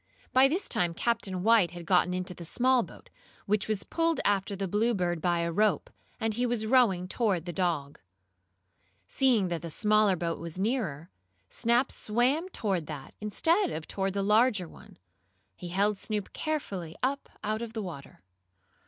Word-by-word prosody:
By 260 +1 +7
this 355 +8 -1
time 170 -1 0
Captain 195 -6 -1
White 220 -5 +5
had 175 -1 -9
gotten 180 0 +3
into 180 0 -3
the 175 - -10
small 250 +8 +2
boat, - - -11 0.3
which 210 0 0
was 215 -2 -1
pulled 330 -1 0
after 200 0 +1
the 195 0 -3
Bluebird, 185 -5 0
by 175 0 +1
a 170 0 -1
rope, 210 +4 +1 0.3
and 225 -1 0
he 240 +3 -1
was 235 -2 -1
rowing 215 -7 +3
toward 190 -5 0
the 175 - -5
dog. 155 -5 -1 1.1
Seeing 240 -9 +2
that 170 -2 -3
the 170 - -6
smaller 210 +2 +3
boat 165 -1 -3
was 170 0 -7
nearer, 190 - -2 0.4
Snap 240 +2 +1
swam 255 - 0
toward 190 - -2
that, 145 -4 -8
instead 330 - +2
of 155 - -5
toward 195 -1 -2
the 200 0 -1
larger 210 -2 +3
one. - - -16 0.6
He 180 - -8
held 200 +3 +1
Snoop 210 -2 -3
carefully 195 - -3
up 275 +2 -1
out 215 +1 -1
of 230 -1 -6
the 220 -2 -3
water. 140 - -9
200 Hz, 170 wpm, -29 LUFS, 175-235 Hz, 1.1 s, By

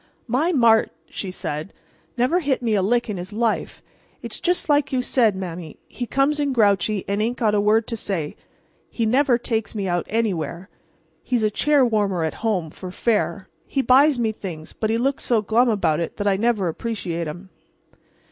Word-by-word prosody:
"My 265 +9 +1
Mart," 235 -7 +4 0.2
she 195 - -5
said, 155 -1 -5 0.4
"never 255 +9 +2
hit 275 -6 -1
me 225 -2 +1
a 200 - +3
lick 240 +5 +1
in 210 -3 -3
his 180 +3 -6
life. 225 +1 -1 0.4
It's - - -5
just 355 0 0
like 290 -2 +2
you 255 -2 0
said, 230 -6 +2
Mame; 175 -4 -6
he 245 - -5
comes 275 +6 +1
in 285 -2 0
grouchy 205 -3 +2
and 200 +1 0
ain't 235 +3 -1
got 215 -3 +1
a 205 - +3
word 215 +2 +3
to 230 - -4
say. 185 -8 -3 0.5
He 230 - -1
never 255 +2 +3
takes 225 -2 -3
me 200 -2 -2
out 175 -1 -1
anywhere. 190 -5 -2 0.5
He's 245 -3 -1
a 215 - +2
chair 290 +4 +3
warmer 205 -7 +1
at 160 - -1
home 190 -9 -1
for 185 - -8
fair. 210 0 -1 0.2
He 270 - 0
buys 275 +2 +5
me 225 -2 +1
things, 170 -7 -8
but 220 - -2
he 225 - +1
looks 270 +3 -1
so 225 -3 +1
glum 235 +4 +3
about 190 -8 +1
it 170 - -4
that 205 - -3
I 200 -1 +3
never 210 -2 +1
appreciate 170 -3 -3
'em." 175 +5 -8
220 Hz, 195 wpm, -22 LUFS, 190-245 Hz, 0.5 s, buys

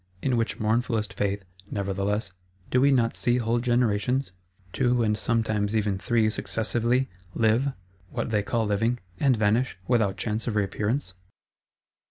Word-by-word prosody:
In 130 -2 +2
which 115 -1 -1
mournfulest 110 0 0
faith, 100 -1 -2 0.2
nevertheless, 100 +1 -1 0.4
do 125 - +4
we 140 - +5
not 120 -4 +2
see 120 0 +2
whole 120 0 +1
generations 120 0 +1 0.4
(two, 125 -2 +2
and 105 -1 +2
sometimes 110 -2 0
even 105 -3 +1
three 115 +1 +2
successively) 120 +4 0 0.3
live, 115 +5 +2 0.4
what 120 +1 -3
they 105 -2 +2
call 115 +2 0
living; 115 +4 +1 0.2
and 135 -4 +3
vanish,—without 110 -2 +1
chance 110 +3 -2
of 110 - -1
reappearance? 105 +2 -1
115 Hz, 135 wpm, -26 LUFS, 105-120 Hz, 0.4 s, we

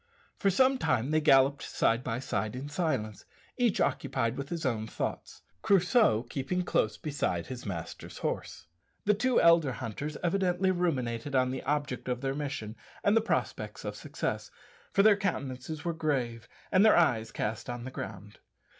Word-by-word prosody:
For 200 - +3
some 260 +7 +3
time 120 - +1
they 155 0 +3
galloped 135 -1 +5
side 115 +2 +1
by 115 -2 -2
side 115 -3 -2
in 135 +3 -5
silence, 145 - -2 0.3
each 240 -5 +1
occupied 115 -2 0
with 140 +1 -5
his 170 -3 -3
own 110 -4 -1
thoughts, - - -5 0.2
Crusoe 190 - +4
keeping 135 +8 -2
close 110 -10 +1
beside 140 - -2
his 125 -4 -7
master's 85 -5 -6
horse. - - -4 0.4
The 210 - +5
two 245 +5 +2
elder 165 -5 +5
hunters 130 +6 -5
evidently 185 +1 +2
ruminated 140 -7 -1
on 130 -1 +3
the 130 - -4
object 145 -4 -2
of 125 0 -2
their 135 -1 -1
mission 135 -7 -4 0.3
and 205 - +4
the 225 - +5
prospects 225 - -2
of - - -4
success, - - -4 0.4
for 195 - +4
their 215 -1 +7
countenances 145 -6 -3
were 170 - 0
grave 130 -8 -2 0.2
and 190 0 +5
their 220 - +6
eyes 115 -9 +2
cast 110 +1 -3
on 120 -1 -4
the 130 - -6
ground. 105 -3 -8
140 Hz, 165 wpm, -30 LUFS, 120-175 Hz, 0.4 s, their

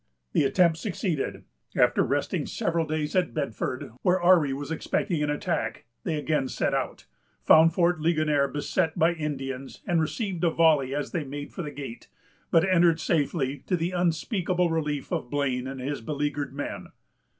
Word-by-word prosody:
The - - +3
attempt 170 +2 +3
succeeded. 180 - -2 0.3
After - - +4
resting - - -1
several 165 -1 -1
days 155 +1 -2
at 180 -2 +1
Bedford, 130 -4 -3
where 185 +1 +3
Ourry 175 -5 +5
was 140 +3 -4
expecting 165 +1 -1
an 150 - 0
attack, 145 -5 -2 0.2
they 165 - 0
again 150 -2 0
set - - -1
out, - - -2 0.4
found 160 - +6
Fort 175 -1 +3
Ligonier 155 -3 +2
beset 160 +3 -1
by 165 +2 +4
Indians, 135 -4 -5
and 170 -2 +2
received 180 +2 -2
a 170 - +5
volley 155 -5 +3
as 145 - -3
they 165 - -1
made 145 +1 -7
for - - -5
the 150 - -4
gate; 135 -5 -8 0.4
but 165 +3 +4
entered 170 -3 +4
safely, 145 -4 0
to 180 - +1
the 170 +2 -1
unspeakable 180 +1 0
relief 150 -3 -2
of 120 - -2
Blane 130 -3 -1
and 135 0 -6
his 140 +1 -3
beleaguered 145 +1 -2
men. 145 - -5
155 Hz, 165 wpm, -27 LUFS, 145-170 Hz, 0.4 s, found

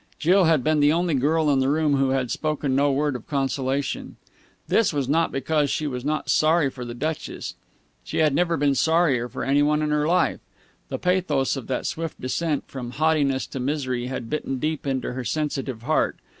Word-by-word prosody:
Jill 185 +3 +4
had 160 -5 +3
been 155 0 +2
the 145 0 +5
only 170 0 +1
girl 155 +4 +2
in 135 - +3
the 130 0 +2
room 150 -1 +2
who 135 0 +2
had 130 -2 0
spoken 150 -3 -1
no 140 +1 +3
word 145 0 0
of 120 - -8
consolation. 135 -1 -2 0.5
This 225 - +3
was 140 -4 -1
not 160 +4 +2
because 145 +2 0
she 155 - -1
was 125 -4 -3
not 155 +1 -2
sorry 155 -2 +3
for 125 - -8
the 120 -1 -6
Duchess. 155 +4 -4 0.5
She - - -5
had 155 -3 +3
never 170 +2 +1
been 145 0 +2
sorrier 145 -5 +2
for - - -5
any 140 +2 +3
one 150 +1 +2
in 150 - 0
her 150 0 +1
life. 180 +2 +2 0.5
The - - -3
pathos 175 -8 +1
of 135 -4 -6
that 130 - -2
swift 165 -1 -4
descent 150 +4 -1
from 125 -2 -7
haughtiness 145 -3 +1
to 135 - -4
misery 130 -2 -2
had 130 -2 -5
bitten 135 -1 -3
deep 155 +2 -2
into 130 -2 -2
her 130 0 -4
sensitive 135 -2 -3
heart. 155 +5 +1
145 Hz, 200 wpm, -24 LUFS, 135-155 Hz, 0.5 s, the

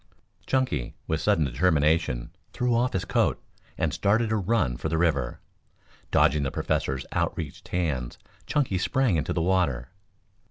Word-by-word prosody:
Chunky, 130 - 0
with - - -1
sudden 80 - +3
determination, 75 -2 +1 0.2
threw 125 0 +1
off 120 +2 +1
his 95 - -1
coat, - - +1 0.4
and - - 0
started 110 +2 +2
on 110 - +1
a - - -2
run 95 - +1
for 80 - -3
the 80 - 0
river. 75 -8 0 0.7
Dodging 75 -2 +3
the 70 - 0
Professor's 65 0 -1
outstretched 75 -5 -3
hands, 75 -9 -2 0.3
Chunky 130 -11 +1
sprang 130 -1 +2
into 75 - -1
the 85 - 0
water. 85 -8 +1
80 Hz, 150 wpm, -26 LUFS, 70-100 Hz, 0.7 s, sudden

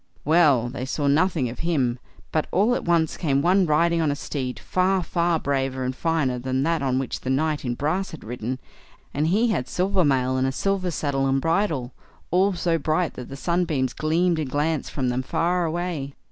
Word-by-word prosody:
Well! 150 -6 +4
they 125 +1 -5
saw 145 +2 -2
nothing 155 -1 +2
of 120 - -7
him; 135 -8 0 0.3
but 155 - 0
all 210 +6 +3
at - - -2
once 165 -2 +1
came 140 -4 +1
one 185 +1 +4
riding 165 +2 +3
on 155 - +1
a 145 - 0
steed, 130 -3 -4
far, 185 0 +1
far, 170 0 +1
braver 135 -2 -1
and 130 0 -2
finer 150 -6 0
than 130 +1 -1
that 165 0 +1
on 130 -2 0
which 130 -1 -3
the 130 - -5
knight 150 +3 0
in 120 -2 -2
brass 170 +9 -1
had 160 - -10
ridden, 120 +2 -4 0.6
and 150 +2 0
he 215 +8 +2
had 125 - -1
silver 190 +1 +1
mail, 130 -3 +2
and 130 0 +1
a - - 0
silver 195 +5 -1
saddle 140 -4 -1
and 135 0 +2
bridle, 165 -5 0 0.4
all 190 +3 +3
so 170 -2 0
bright 155 +3 0
that 125 - -8
the 135 - -7
sun 175 +4 0
beams 130 -6 -1
gleamed 165 +2 +1
and 150 -4 -2
glanced 150 +2 -1
from 130 -3 -1
them 125 +1 0
far 175 +6 0
away. 160 -4 -3
155 Hz, 205 wpm, -24 LUFS, 130-175 Hz, 0.6 s, Well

